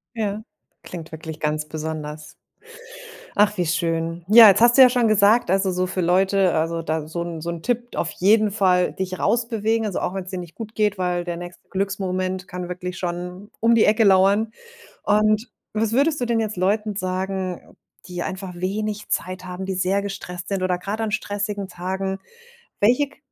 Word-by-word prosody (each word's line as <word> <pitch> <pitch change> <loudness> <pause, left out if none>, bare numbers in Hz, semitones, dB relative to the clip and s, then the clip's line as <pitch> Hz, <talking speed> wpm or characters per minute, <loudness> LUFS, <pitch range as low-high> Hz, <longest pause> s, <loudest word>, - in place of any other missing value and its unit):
Ja. 215 -1 -2 0.4
Klingt 165 -3 -9
wirklich 160 0 -7
ganz 150 0 -1
besonders. 155 -1 -6 1.0
Ach 210 0 +3
wie 180 - +1
schön. 165 0 -1
Ja, 220 +1 +10
jetzt 200 +2 +5
hast 240 0 +6
du 270 - +9
ja 255 - +8
schon 240 -2 +2
gesagt, 215 0 +4
also, 190 0 +2
so 180 0 0
für 185 0 -2
Leute 190 +1 +3
also, 165 +1 -1
da 160 -1 -2
so 170 +1 -3
'n 170 -2 -6
so 170 - -6
'n 170 -1 -6
Tipp 240 0 -2
auf 165 - -1
jeden 210 +3 +3
Fall 185 -3 +2
dich 185 -1 -4
raus 235 0 +1
bewegen, 225 0 0
also, 195 - -2
auch 180 - -2
wenn 190 -2 -4
es 185 - -9
dir 185 - -4
nicht 175 -2 -9
gut 220 -1 -8
geht, 210 -2 +1
weil 180 -1 -1
der 175 -1 -4
nächste 175 0 -10
Glücksmoment 190 -1 -2
kann 180 -1 -6
wirklich 180 0 -5
schon 180 +3 -5
um 230 +1 +4
die 225 - +5
Ecke 220 +1 +4
lauern. 200 +3 +4 0.5
Und 215 +2 +2 0.2
was 220 0 0
würdest 290 +4 +2
du 245 - 0
denn 230 -1 +1
jetzt 215 -2 -3
Leuten 210 +3 0
sagen, 185 -1 -3 0.4
die 180 -1 -5
einfach 185 -1 -5
wenig 205 +4 -3
Zeit 185 0 -2
haben, 180 +1 -6
die 190 0 -3
sehr 190 +2 +1
gestresst 180 -3 -6
sind 195 -2 -2
oder 185 -1 +1
grad 200 +5 -4
an 220 -1 -2
stressigen 205 -1 -3
Tagen. 190 +2 -3 0.6
Welche 250 +7 +3
k - - -22
190 Hz, 195 wpm, -22 LUFS, 180-215 Hz, 1.0 s, Ja